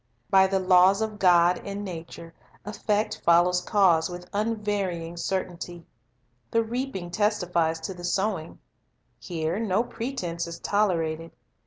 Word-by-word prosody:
By 190 0 +6
the 195 0 +1
laws 185 +1 +5
of 215 -1 -5
God 175 -1 +5
in 200 +1 -5
nature, 165 -2 -8 0.3
effect 210 0 -1
follows 175 +1 +4
cause 180 -6 +3
with 180 0 -8
unvarying 205 -6 -2
certainty. 175 -1 -4 0.6
The 230 0 +2
reaping 225 -6 -4
testifies 180 -5 0
to 175 +4 -4
the 175 -1 -11
sowing. 185 -2 -1 0.6
Here 165 +1 -3
no 220 -1 +1
pretense 190 -10 -4
is 170 0 -7
tolerated. 165 -6 0
185 Hz, 125 wpm, -26 LUFS, 170-205 Hz, 0.6 s, By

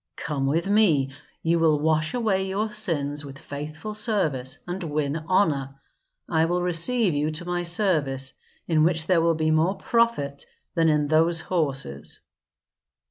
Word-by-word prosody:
Come 140 -3 -3
with 165 +6 0
me; 170 -11 +2 0.3
you 165 +1 +1
will 155 -2 +3
wash 155 +4 0
away 200 -5 0
your 210 +3 -2
sins 150 -9 0
with 140 -1 -10
faithful 155 +9 -7
service 155 - +1
and 180 +1 -5
win 150 -2 -2
honor. 140 -8 0 0.5
I 160 -1 +1
will 175 +1 -1
receive 180 +4 +2
you 145 +1 0
to 155 +2 -3
my 175 0 -2
service, 155 -8 +2 0.3
in 160 -2 +2
which 160 -1 +2
there 175 -1 +2
will 165 0 +2
be 155 0 0
more 160 +5 +2
profit 195 -11 -1 0.3
than 165 -1 +2
in 150 -1 +1
those 165 +2 +2
horses." 135 - -3
160 Hz, 150 wpm, -24 LUFS, 145-185 Hz, 0.5 s, will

